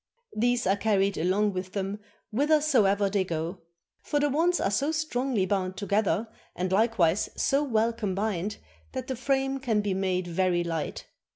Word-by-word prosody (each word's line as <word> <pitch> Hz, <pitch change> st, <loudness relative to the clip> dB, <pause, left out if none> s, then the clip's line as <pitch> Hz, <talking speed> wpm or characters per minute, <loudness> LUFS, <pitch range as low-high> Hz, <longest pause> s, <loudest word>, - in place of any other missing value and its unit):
These 240 Hz, +2 st, +1 dB
are 190 Hz, +1 st, +3 dB
carried 200 Hz, -2 st, +1 dB
along 195 Hz, +5 st, +1 dB
with 185 Hz, 0 st, -5 dB
them 195 Hz, +1 st, -3 dB, 0.3 s
whithersoever 255 Hz, -7 st, +3 dB
they 195 Hz, -1 st, +1 dB
go; 170 Hz, +1 st, -4 dB, 0.4 s
for 290 Hz, -, -1 dB
the 290 Hz, 0 st, +2 dB
wands 340 Hz, +5 st, +2 dB
are 195 Hz, -, 0 dB
so 280 Hz, +9 st, +1 dB
strongly 265 Hz, -9 st, 0 dB
bound 190 Hz, -1 st, -1 dB
together 210 Hz, +1 st, 0 dB, 0.3 s
and 185 Hz, +1 st, -2 dB
likewise 200 Hz, -4 st, +2 dB
so 280 Hz, +2 st, +2 dB
well 230 Hz, -4 st, +1 dB
combined 205 Hz, -2 st, -2 dB, 0.4 s
that 260 Hz, -2 st, -4 dB
the 260 Hz, -, -3 dB
frame 270 Hz, +1 st, 0 dB
can 230 Hz, -6 st, +1 dB
be 205 Hz, -2 st, -1 dB
made 185 Hz, -1 st, 0 dB
very 175 Hz, 0 st, +1 dB
light. 165 Hz, -2 st, -4 dB
205 Hz, 160 wpm, -27 LUFS, 190-255 Hz, 0.4 s, are